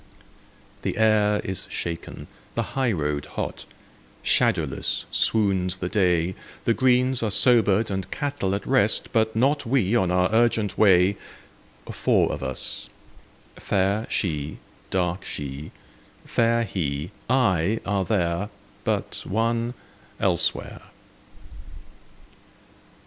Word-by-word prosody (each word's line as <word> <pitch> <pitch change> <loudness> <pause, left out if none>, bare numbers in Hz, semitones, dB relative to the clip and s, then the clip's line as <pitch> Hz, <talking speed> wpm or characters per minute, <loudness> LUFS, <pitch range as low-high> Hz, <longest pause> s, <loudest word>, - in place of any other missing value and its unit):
The - - -3
air 105 -1 +3
is 95 -1 -3
shaken, 85 -1 -5 0.3
the - - 0
high 130 -3 +1
road 75 -5 -2
hot, - - -4 0.6
Shadowless - - +1
swoons 95 -4 +2
the 90 -1 -3
day, 90 -3 +2 0.3
The 115 - +3
greens 125 +1 +2
are 110 - 0
sobered 110 -1 +4
and 95 -1 -3
cattle 140 -10 -2
at 100 - -5
rest; 105 +2 +2
but 110 -1 +1
not 140 +5 +2
We 120 -4 +1
on 95 -6 +2
our 90 0 +3
urgent 110 -4 +2
way,— 95 -1 +4 0.7
Four - - +2
of - - -5
us; - - -3 0.7
fair 100 +3 0
She, 75 -5 -2 0.3
dark 90 -1 -1
She, 70 +2 -6 0.6
fair 115 0 +2
He, 80 -5 -3 0.2
I, 110 -6 +2
are 100 -1 0
there, 90 0 0 0.3
But - - -2
one—elsewhere. 115 +3 -2
100 Hz, 105 wpm, -24 LUFS, 90-115 Hz, 0.7 s, sobered